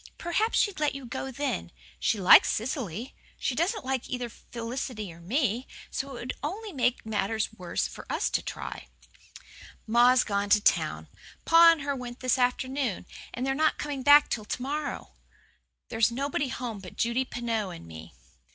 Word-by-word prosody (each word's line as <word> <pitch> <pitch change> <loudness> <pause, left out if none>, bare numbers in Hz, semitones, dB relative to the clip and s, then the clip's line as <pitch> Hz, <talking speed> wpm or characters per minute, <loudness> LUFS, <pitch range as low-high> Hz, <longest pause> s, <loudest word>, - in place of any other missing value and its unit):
"Perhaps 425 +7 0
she'd 405 -5 +1
let 295 -2 +1
you 275 -2 -7
go 265 +2 -5
then. 275 +2 -3 0.3
She 220 - +1
likes 185 - +8
Cecily. 230 - -3 0.2
She - - -1
doesn't 340 - -1
like 265 -2 -2
either 245 -2 -3
Felicity 230 -4 -6
or 165 - -15
me, 240 - 0 0.2
so 275 - -3
it - - -8
would 250 - -4
only 395 +8 -5
make 250 -4 0
matters 220 0 -1
worse 180 -4 -2
for - - -11
us - - 0
to - - +1
try." - - -7 1.0
"Ma's 240 +3 +5
gone 200 -1 -1
to 210 - +6
town - - +1 0.4
pa 335 +1 +8
and 320 - -6
her 280 0 -1
went 245 -1 -7
this 255 0 +2
afternoon 255 -4 0 0.3
and 250 - -3
they're 270 - +1
not 310 +3 +2
coming 285 -2 -4
back 290 +2 +7
till 215 -3 -3
to 245 - -4
morrow. 290 +2 -4 0.8
There's 225 0 +3
nobody 280 +3 -1
home 240 -4 -5
but 185 -2 -11
Judy 235 +3 +1
Pineau 230 -5 -2
and 170 - -9
me." 80 -1 -11
250 Hz, 170 wpm, -28 LUFS, 220-280 Hz, 1.0 s, likes